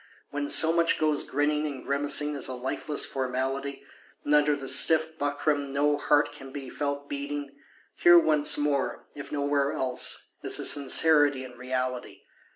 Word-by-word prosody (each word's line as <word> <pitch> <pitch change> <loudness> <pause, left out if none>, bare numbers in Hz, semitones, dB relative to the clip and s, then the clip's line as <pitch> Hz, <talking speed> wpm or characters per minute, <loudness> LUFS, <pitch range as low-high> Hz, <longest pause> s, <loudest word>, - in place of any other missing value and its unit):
When 145 0 -3
so 160 +2 +4
much 170 0 +2
goes 155 -2 0
grinning 150 +2 -1
and 140 -3 -8
grimacing 145 +1 +1
as 140 - -2
a 130 - -5
lifeless 130 +4 -3
Formality, 135 +1 -4 0.4
and 145 - 0
under 150 0 +3
the 135 -1 -8
stiff 160 +2 +4
buckram 145 0 -1
no 145 +1 +1
heart 145 0 +1
can 135 -2 -12
be 135 -2 -8
felt 140 -1 -4
beating, 145 0 -6 0.4
here 175 0 +6
once 155 -3 +3
more, 145 -2 -2
if 145 - -10
nowhere 140 -1 0
else, 130 -1 -1
is - - +2
a - - -3
Sincerity 145 -1 +3
and 125 -1 -11
Reality. 125 0 -5
145 Hz, 160 wpm, -26 LUFS, 135-150 Hz, 0.4 s, here